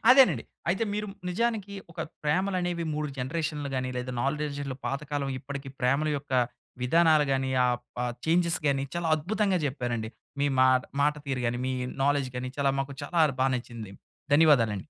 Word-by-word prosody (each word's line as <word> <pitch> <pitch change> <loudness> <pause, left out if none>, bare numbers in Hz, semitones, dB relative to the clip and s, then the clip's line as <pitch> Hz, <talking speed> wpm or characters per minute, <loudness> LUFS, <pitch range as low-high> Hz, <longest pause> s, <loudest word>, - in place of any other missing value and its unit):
అదేనండి. 250 - +7 0.3
అయితే 190 +6 +2
మీరు 210 0 -2 0.2
నిజానికి 205 0 -1 0.2
ఒక - - -6 0.2
ప్రేమలనేవి 175 +1 0
3 150 0 -2
జనరేషన్లు 150 +2 -2
గాని, 130 0 -1
లేదా 125 0 -3
నాలెడ్జ్‌లో 140 -2 -2
పాతకాలం 140 0 -2
ఇప్పడికీ 135 +1 -6
ప్రేమల 140 +4 +2
యొక్క 140 -1 -12 0.5
విధానాలు 155 +3 +5
గాని, 130 0 0
ఆ - - +4 0.3
ప - - -7 0.3
చేంజ్‌స్ 170 +1 +3
గానీ, 135 -1 +2
చాలా 170 -1 -1
అద్భుతంగా 195 +4 +1
జెప్పారండి. 120 -5 -2 0.3
మీ 145 - +3
మాట 130 0 +5 0.2
మాట 150 +1 +3
తీరు 130 -2 -1
గాని, 120 +1 0
మీ 130 - 0 0.3
నాలెడ్జ్ 140 -2 +2
గాని, 125 0 -3
చాలా 140 -1 +3
మాకు 135 +1 -4
చాలార్ 155 -4 +2
బా 135 - +4
నచ్చింది. 115 -5 -7 0.4
ధన్యవాదాలండి. 125 -10 +5
145 Hz, 155 wpm, -28 LUFS, 130-170 Hz, 0.5 s, అదేనండి